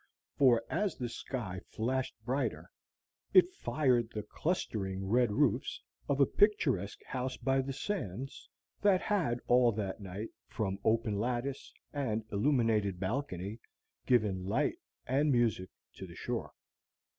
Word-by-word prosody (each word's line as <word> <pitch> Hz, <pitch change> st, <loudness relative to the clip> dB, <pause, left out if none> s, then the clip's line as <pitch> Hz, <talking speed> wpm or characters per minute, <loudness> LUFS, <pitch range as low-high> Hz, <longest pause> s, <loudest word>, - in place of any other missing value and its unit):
For 120 Hz, -5 st, +5 dB
as 200 Hz, +4 st, -1 dB
the 125 Hz, -2 st, -3 dB
sky 110 Hz, -6 st, -5 dB
flashed 130 Hz, +4 st, -1 dB
brighter 130 Hz, +3 st, -2 dB, 0.6 s
it 370 Hz, 0 st, +7 dB
fired 125 Hz, -, +1 dB
the 105 Hz, -2 st, -5 dB
clustering 95 Hz, -, -2 dB
red 120 Hz, +3 st, +3 dB
roofs -, -, +1 dB, 0.3 s
of 140 Hz, -1 st, +1 dB
a 140 Hz, -, +7 dB
picturesque 135 Hz, -, +2 dB
house 130 Hz, 0 st, -3 dB
by 135 Hz, +1 st, +2 dB
the 135 Hz, +1 st, -4 dB
sands 135 Hz, -, -4 dB, 0.3 s
that 200 Hz, -2 st, +5 dB
had 165 Hz, -, 0 dB
all 125 Hz, -1 st, +5 dB
that 100 Hz, -2 st, -3 dB
night, 100 Hz, +2 st, -6 dB, 0.2 s
from 95 Hz, -3 st, -2 dB
open 110 Hz, -2 st, +2 dB
lattice 125 Hz, +4 st, -2 dB, 0.2 s
and 115 Hz, -7 st, -1 dB
illuminated 105 Hz, -5 st, +2 dB
balcony, 100 Hz, -1 st, -3 dB, 0.5 s
given 105 Hz, -7 st, +2 dB
light 115 Hz, +10 st, 0 dB, 0.3 s
and 145 Hz, +4 st, +2 dB
music 115 Hz, -7 st, +2 dB, 0.3 s
to -, -, -7 dB
the -, -, -11 dB
shore. -, -, -3 dB
120 Hz, 130 wpm, -32 LUFS, 105-135 Hz, 0.6 s, it